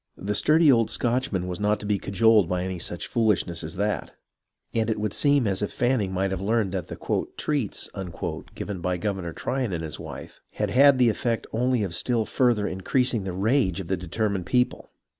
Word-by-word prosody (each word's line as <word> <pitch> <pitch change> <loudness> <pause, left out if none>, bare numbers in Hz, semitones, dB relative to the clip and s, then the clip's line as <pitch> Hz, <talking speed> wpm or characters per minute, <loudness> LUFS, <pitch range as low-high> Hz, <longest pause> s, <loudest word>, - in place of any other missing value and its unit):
The 100 +2 -2
sturdy 155 +6 +5
old 115 -3 +3
Scotchman 120 -7 0
was 90 -1 -4
not 105 0 +1
to - - -7
be 105 -1 +1
cajoled 105 -2 +3
by 90 0 0
any 95 -1 -4
such 85 0 -4
foolishness 105 -7 0
as 80 +3 -6
that, 105 +2 -2 0.6
and 115 0 0
it 110 -1 -1
would 105 -1 -2
seem 145 -3 +3
as 95 -1 0
if 105 - -2
Fanning 120 -6 +1
might 95 +1 0
have 95 -1 -3
learned 105 -1 +1
that 95 -2 -3
the - - -7 0.3
" - - -39
treats 145 -9 -2 0.3
" - - -5
given 100 -4 -5
by 90 0 -1
Governor 95 -3 -3
Tryon 125 +6 -2
and 85 -2 -3
his 80 -2 -6
wife - - -9
had - - -2
had 140 +1 +6
the 125 -2 +5
effect 115 +1 -1
only 125 0 +1
of 95 -4 -3
still 115 +4 0
further 120 -5 +2
increasing 115 +3 0
the 95 - -3
rage 100 0 +1
of 90 -3 -6
the 95 - +2
determined 95 +1 -2
people. 125 0 0
105 Hz, 205 wpm, -25 LUFS, 95-120 Hz, 0.6 s, had